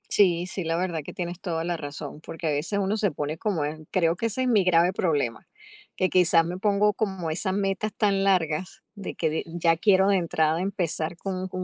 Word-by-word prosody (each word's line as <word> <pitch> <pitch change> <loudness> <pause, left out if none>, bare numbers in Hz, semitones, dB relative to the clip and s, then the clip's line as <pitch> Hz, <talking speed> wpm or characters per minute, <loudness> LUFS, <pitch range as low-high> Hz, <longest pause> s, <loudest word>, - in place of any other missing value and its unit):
Sí, 180 -4 +3
sí, 185 +1 -4
la 165 +1 0
verdad 175 -3 -1
que - - -8
tienes 175 -1 -5
toda 165 -4 -3
la 175 0 -2
razón, 145 0 -7
porque 165 +1 -6
a - - +2
veces 155 +8 -1
uno 200 +3 0
se 205 -3 +1
pone 150 +2 -4
como 185 -5 -1
en 155 +1 -5
creo 170 -2 +2
que 230 - -2
ese 230 +3 -1
es - - 0
mi 220 -5 +4
grave 175 0 +4
problema, 145 -11 -1 0.5
que 185 - +1
quizás 170 -2 +4
me 175 +2 -4
pongo 205 +1 +2
como 190 -6 -2
esas 185 +4 -1
metas 200 +2 -1
tan 200 -2 +2
largas 180 -2 0
de 200 -2 -6
que 160 - 0
de 155 - -2
ya 165 0 +1
quiero 190 +1 +4
de 200 - +4
entrada 160 -2 +1
empezar 175 -4 -2
con 185 +1 -4
con 185 0 -5
180 Hz, 220 wpm, -26 LUFS, 165-195 Hz, 0.5 s, mi